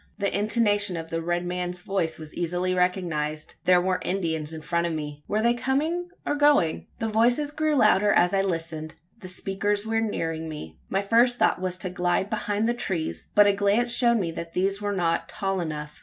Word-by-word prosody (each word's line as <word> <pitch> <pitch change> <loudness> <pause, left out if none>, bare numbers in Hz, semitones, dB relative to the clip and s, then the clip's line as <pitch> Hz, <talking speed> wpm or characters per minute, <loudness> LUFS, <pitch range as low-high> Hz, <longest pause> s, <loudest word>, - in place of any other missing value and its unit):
The 200 -2 -1
intonation 205 -3 +1
of 165 0 -7
the 165 0 -1
red 175 +1 -1
man's 180 0 -3
voice 190 -6 -1
was 155 -1 -9
easily 175 +1 -1
recognised. 170 -4 -1
There 180 -1 +6
were 185 0 0
Indians 160 -5 -1
in 160 -1 -7
front 170 +1 0
of 170 - -3
me! 150 -1 -6
Were 215 +1 0
they 235 0 +4
coming 310 +8 -1 0.2
or - - 0
going? 290 - +3
The 225 - -2
voices 240 +7 +2
grew 310 0 0
louder 210 -4 +4
as 175 -1 +3
I 195 - +3
listened 165 -4 -3 0.2
the 185 - -9
speakers 200 +3 -1
were 225 0 0
nearing 165 -7 -2
me. 80 - -8
My 195 +1 0
first 235 +4 +3
thought - - +2
was 185 -1 -2
to 185 0 -4
glide 180 +3 0
behind 210 0 0
the 240 - +2
trees; 190 -9 -3
but 205 - +7
a 200 - +4
glance 205 +4 +1
showed 235 -1 +3
me 175 -6 -1
that 165 0 -7
these 195 +2 0
were 205 0 -1
not 170 -3 0
tall 195 -2 -2
enough. 150 -2 -5
190 Hz, 200 wpm, -25 LUFS, 165-215 Hz, 0.2 s, but